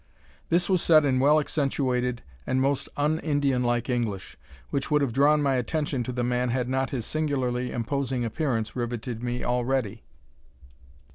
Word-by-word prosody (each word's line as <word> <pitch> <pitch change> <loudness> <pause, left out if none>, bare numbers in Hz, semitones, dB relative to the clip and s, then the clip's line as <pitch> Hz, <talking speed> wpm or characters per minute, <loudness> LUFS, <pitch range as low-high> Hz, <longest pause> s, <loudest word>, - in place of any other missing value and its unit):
This 175 +1 +2
was 185 -3 +2
said 155 -3 +5
in 130 -2 +2
well 150 +3 +5
accentuated 130 -5 -1 0.2
and 130 - +1
most 135 +1 0
un 150 +2 +1
Indianlike 130 -6 0
English, 115 -7 -2 0.4
which 140 +1 -2
would 150 -1 +3
have 125 -5 -1
drawn 145 +3 +4
my 135 -2 +2
attention 140 +2 -1
to 130 - -3
the 125 0 -2
man 125 +1 0
had 125 0 -1
not 130 +1 0
his 120 -5 -3
singularly 130 -5 -1
imposing 130 +1 -2
appearance 115 -3 -2
riveted 120 -1 -4
me 125 0 -3
already. 120 -3 -1
130 Hz, 155 wpm, -26 LUFS, 120-145 Hz, 0.4 s, said